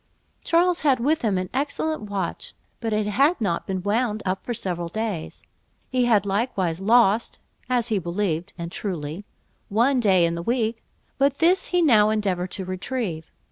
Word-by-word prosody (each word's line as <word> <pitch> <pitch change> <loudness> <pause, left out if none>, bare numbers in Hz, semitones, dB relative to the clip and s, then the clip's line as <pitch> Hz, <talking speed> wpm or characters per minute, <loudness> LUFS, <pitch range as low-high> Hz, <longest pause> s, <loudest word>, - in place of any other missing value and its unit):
Charles 345 +1 +2
had 275 -4 +3
with 300 +6 +1
him 210 -5 +1
an 185 0 -3
excellent 295 +3 -1
watch, 195 -4 -4 0.2
but 225 -1 -3
it 210 0 +1
had 275 - +2
not 185 -7 -1
been 185 -2 -3
wound 215 +1 0
up 190 0 -2
for - - -5
several 175 -6 -3
days; 215 -4 -4 0.5
he 255 -1 +2
had 215 -5 +3
likewise 195 -4 -1
lost, 225 +1 +3 0.3
as 245 -2 +1
he 215 -3 +1
believed 175 -1 -2
(and 170 -1 -5
truly), 175 -1 -5 0.4
one 245 +6 +3
day 190 -6 +4
in 170 - 0
the 170 - -4
week; 230 +2 -1 0.4
but 280 0 +2
this 360 +3 +3
he 355 -1 +2
now 215 -8 +5
endeavoured 190 -4 0
to 190 +1 -6
retrieve. 185 -3 -4
210 Hz, 170 wpm, -24 LUFS, 185-250 Hz, 0.5 s, now